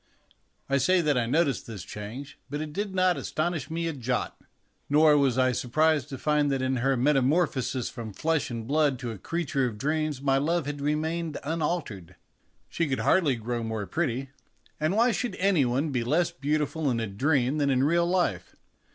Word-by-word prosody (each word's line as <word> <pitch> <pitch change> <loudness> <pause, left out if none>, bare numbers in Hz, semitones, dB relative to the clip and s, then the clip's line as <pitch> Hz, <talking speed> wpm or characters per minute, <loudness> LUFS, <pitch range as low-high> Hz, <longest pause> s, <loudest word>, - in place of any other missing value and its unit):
I 140 0 +2
say 185 +6 +3
that 150 -3 +1
I 120 -2 +1
noticed 145 0 +1
this 105 -7 -7
change, 110 +9 -8
but 145 +2 -3
it 155 -1 -5
did 200 +1 -3
not 185 -3 +3
astonish 155 +1 -2
me 165 +1 -2
a 165 - -1
jot. 125 -2 -2 0.5
Nor 150 +1 +5
was 135 -4 +2
I 130 0 +3
surprised 150 +3 +1
to 135 - -6
find 150 -1 +1
that 135 - 0
in 130 0 0
her 135 +2 +1
metamorphosis 135 -1 +1
from 115 -3 -7
flesh 160 +7 -1
and 115 -2 -5
blood 145 0 +2
to 120 -2 -5
a 110 - -8
creature 140 - -1
of 110 -3 -6
dreams 155 +2 -1
my 135 0 +2
love 165 +2 0
had 145 0 -5
remained 155 +2 -1
unaltered. 150 - -3 0.5
She 165 - -1
could 135 -2 -1
hardly 160 -8 +3
grow 120 +1 -3
more 110 -2 -3
pretty; 130 +8 -2 0.5
and 155 +5 0
why 235 +2 +4
should 245 +1 -2
any 185 -7 +2
one 135 +5 0
be 125 -3 0
less 155 +8 +1
beautiful 150 +2 -1
in 120 -2 0
a 115 - -1
dream 130 +6 +1
than 140 -1 +2
in 130 -1 +2
real 170 +4 +2
life? 180 0 -1
145 Hz, 190 wpm, -27 LUFS, 125-160 Hz, 0.5 s, Nor